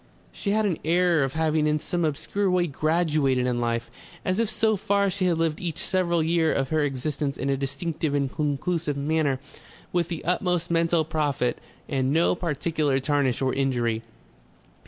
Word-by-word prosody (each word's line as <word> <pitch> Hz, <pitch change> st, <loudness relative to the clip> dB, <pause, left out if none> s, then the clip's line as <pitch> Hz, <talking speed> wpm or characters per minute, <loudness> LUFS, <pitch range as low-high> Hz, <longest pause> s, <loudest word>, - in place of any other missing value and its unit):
She 200 Hz, -, -4 dB
had 215 Hz, +1 st, +2 dB
an 180 Hz, -6 st, 0 dB
air 170 Hz, -1 st, +3 dB
of 135 Hz, -1 st, -2 dB
having 155 Hz, -1 st, +1 dB
in 150 Hz, 0 st, +2 dB
some 175 Hz, +3 st, -2 dB
obscure 190 Hz, +6 st, -1 dB
way 180 Hz, -1 st, +2 dB
graduated 155 Hz, -4 st, +1 dB
in 120 Hz, -1 st, 0 dB
life, 115 Hz, 0 st, -1 dB, 0.3 s
as 185 Hz, +3 st, 0 dB
if 230 Hz, -3 st, +1 dB
so 220 Hz, 0 st, +2 dB
far 200 Hz, 0 st, +1 dB
she 190 Hz, 0 st, -1 dB
had 170 Hz, -2 st, +2 dB
lived 165 Hz, -2 st, 0 dB
each 170 Hz, -4 st, -3 dB
several 175 Hz, -3 st, +1 dB
year 165 Hz, 0 st, +2 dB
of 135 Hz, -1 st, 0 dB
her 155 Hz, -, +1 dB
existence 140 Hz, 0 st, -2 dB
in 140 Hz, -, -1 dB
a -, -, +2 dB
distinctive 145 Hz, +2 st, -2 dB
and 140 Hz, -2 st, 0 dB
conclusive 150 Hz, +1 st, -1 dB
manner 145 Hz, -2 st, +1 dB, 0.5 s
with 175 Hz, -2 st, +1 dB
the 170 Hz, -3 st, -5 dB
utmost 180 Hz, -1 st, 0 dB
mental 165 Hz, -1 st, +2 dB
profit 145 Hz, -5 st, -1 dB, 0.3 s
and 135 Hz, -2 st, 0 dB
no 165 Hz, +3 st, +3 dB
particular 155 Hz, -4 st, 0 dB
tarnish 135 Hz, -2 st, +1 dB
or 130 Hz, -, +1 dB
injury. 120 Hz, -4 st, 0 dB
155 Hz, 175 wpm, -25 LUFS, 140-175 Hz, 0.5 s, air